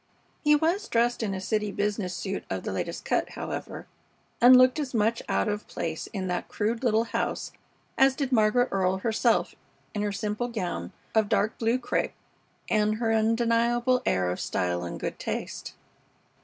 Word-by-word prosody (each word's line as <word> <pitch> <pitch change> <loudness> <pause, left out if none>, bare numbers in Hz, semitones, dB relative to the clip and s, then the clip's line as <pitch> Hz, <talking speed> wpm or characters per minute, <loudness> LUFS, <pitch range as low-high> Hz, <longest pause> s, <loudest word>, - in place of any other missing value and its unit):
He 300 -1 +6
was 340 +8 +1
dressed 240 +1 +1
in 200 -3 -1
a - - -3
city 210 +1 -1
business 205 -3 -2
suit 190 +2 -4
of - - -3
the - - -3
latest - - -4
cut, - - 0
however, - - -5 0.6
and 250 +1 +9
looked 255 +3 +5
as 270 -4 -3
much 225 +1 +2
out - - +1
of 210 0 -3
place 160 -1 -4
in 195 -4 -4
that 180 -1 -2
crude 225 +3 -2
little 225 -2 +3
house 230 - -2 0.5
as 270 0 +5
did 275 -2 -2
Margaret 245 +2 +3
Earle 190 -1 +1
herself 220 -3 +1 0.4
in 205 - -2
her 205 0 0
simple 210 +3 -2
gown 215 -7 -4 0.2
of 220 -2 +2
dark 215 +2 +1
blue 230 +2 +2
crêpe 245 - -1 0.5
and 215 0 +2
her 225 0 0
undeniable 235 +2 +2
air 90 - +1
of 90 - -4
style 90 -1 -1
and 85 - -6
good - - -4
taste. - - -5
220 Hz, 170 wpm, -27 LUFS, 200-240 Hz, 0.6 s, and